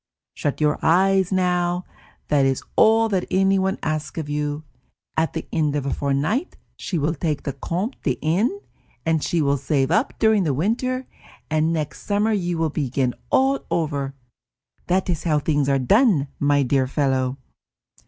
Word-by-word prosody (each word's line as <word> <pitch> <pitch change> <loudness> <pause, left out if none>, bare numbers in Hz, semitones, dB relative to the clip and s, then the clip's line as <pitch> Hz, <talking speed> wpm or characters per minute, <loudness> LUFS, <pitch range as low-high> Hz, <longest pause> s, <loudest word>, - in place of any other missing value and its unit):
Shut 145 - -2
your 150 -1 +1
eyes 190 +2 +3
now; 180 -1 +1 0.4
that 145 -2 +3
is 135 -1 +1
all 225 +1 +5
that 190 -3 0
anyone 190 0 +2
asks 155 0 -3
of 155 -2 -4
you. 150 +1 -2 0.5
At 160 0 0
the 160 - -5
end 150 -2 +1
of 145 -2 -2
a 140 - -1
fortnight 145 - -1 0.2
she 180 - -3
will 155 +1 0
take 155 -2 -2
the 140 - -3
Comte 180 - -4
de 130 -5 -1
N., 205 - +1 0.4
and 160 -2 +1
she 170 -3 +1
will 140 0 +2
save 140 +1 0
up 220 +9 +1
during 220 -2 +3
the 145 -6 0
winter, 255 - -1 0.5
and 155 +1 +2
next 155 -3 -3
summer 210 +2 +1
you 175 -4 -1
will 160 -2 0
begin 130 -3 -1 0.2
over 165 - +1
again. 135 - -8 0.7
That 185 +1 +1
is 175 -4 -2
how 155 -3 +2
things 145 -1 +1
are 135 - +3
done, 165 - +3
my 145 0 +3
dear 130 0 +1
fellow!" 130 -2 0
160 Hz, 165 wpm, -22 LUFS, 145-190 Hz, 0.7 s, all